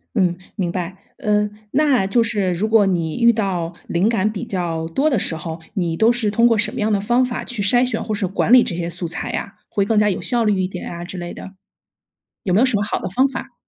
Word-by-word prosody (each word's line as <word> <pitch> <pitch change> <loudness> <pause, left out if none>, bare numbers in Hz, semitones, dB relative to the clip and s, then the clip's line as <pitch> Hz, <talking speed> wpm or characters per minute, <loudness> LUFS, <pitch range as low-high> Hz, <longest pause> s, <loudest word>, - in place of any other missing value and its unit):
嗯， 180 -5 +2 0.2
明 180 -5 -1
白， 180 +1 -4 0.2
呃， 210 -5 +1 0.2
那 270 -8 +3
就 230 +4 +3
是 205 -5 0
如 195 +6 -1
果 220 -2 +4
你 165 -4 -1
遇 235 0 +6
到 185 -6 -2
灵 180 +6 +1
感 215 -2 +1
比 200 - -5
较 165 -4 -3
多 275 - +1
的 260 -8 +1
时 165 - -1
候， 160 +1 -6 0.2
你 175 -4 -1
都 220 +7 +4
是 230 -4 -1
通 230 +3 +4
过 230 -2 +3
什 215 - 0
么 255 - -5
样 215 +1 +1
的 205 - +2
方 240 +5 +2
法 250 -1 -3
去 240 -5 -4
筛 245 +5 +3
选 - - -1
或 215 - -3
是 205 -1 -1
管 190 +3 -1
理 250 -1 +8
这 170 - -3
些 170 0 -3
素 170 0 -4
材 165 +2 -5
呀？ 200 - -4
会 200 -1 0
更 215 0 +2
加 210 - +3
有 190 - -2
效 240 -2 +1
率 210 -3 +2
一 185 - +1
点 185 -1 -7
啊 170 0 -6
之 185 - -7
类 175 0 -5
的。 190 - -10 0.9
有 185 - -1
没 200 - +4
有 260 - +5
什 255 -5 +1
么 205 - 0
好 205 - -1
的 - - -4
方 260 +8 +3
法？ 260 -1 -7
205 Hz, 280 characters per minute, -20 LUFS, 180-230 Hz, 0.9 s, 理